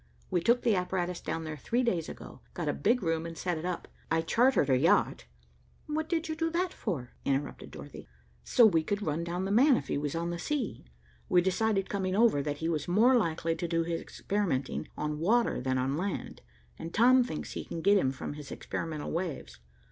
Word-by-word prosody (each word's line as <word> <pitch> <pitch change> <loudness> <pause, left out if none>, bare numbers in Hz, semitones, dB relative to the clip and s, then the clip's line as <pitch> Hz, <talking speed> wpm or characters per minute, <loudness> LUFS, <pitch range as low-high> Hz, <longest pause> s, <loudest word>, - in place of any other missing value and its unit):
We 175 - +2
took 235 +7 +3
the 230 - +3
apparatus 180 -1 -1
down 165 - -3
there 155 -1 -5
three 240 +10 0
days 180 -9 0
ago, - - -10
got 170 -3 -3
a 145 - +1
big 235 +2 +1
room 165 -1 0
and 165 -1 -8
set 175 -3 -2
it 160 - -6
up. 180 -1 -3 0.2
I 160 0 +2
chartered 240 - +3
a - - +5
yacht." 125 - +2 0.6
"What 310 +1 -2
did 330 -2 0
you 315 - -2
do 325 +1 0
that 350 +2 -1
for?" 140 - -4
interrupted 140 +1 -2
Dorothy. - - -10 0.4
"So 235 - +5
we 165 -7 +4
could 205 +6 -2
run 155 +2 -1
down 175 +2 -3
'the 195 - -2
man' 255 +5 +5
if 140 - -6
he - - 0
was 145 +1 -3
on 170 +1 -2
the 170 - -4
sea. 255 - -3 0.4
We 180 - +5
decided, 195 +1 +1
coming 190 -2 -1
over, 220 -9 +4
that 145 0 -3
he 160 - -2
was 155 -3 -1
more 225 +9 +5
likely 165 -6 +1
to 170 +1 -3
do 165 0 +1
his 165 0 -2
experimenting 180 -11 -2
on 150 0 -2
water 225 - +2
than 130 0 0
on 130 +2 0
land, 195 +3 -4 0.4
and 165 - -6
Tom 250 +5 +5
thinks 200 -10 -5
he - - -4
can 165 - -6
get 200 +1 +5
him 130 - +1
from 135 - -6
his 145 -1 -9
experimental 155 -3 -4
waves." 170 - -4
175 Hz, 215 wpm, -30 LUFS, 155-220 Hz, 0.6 s, a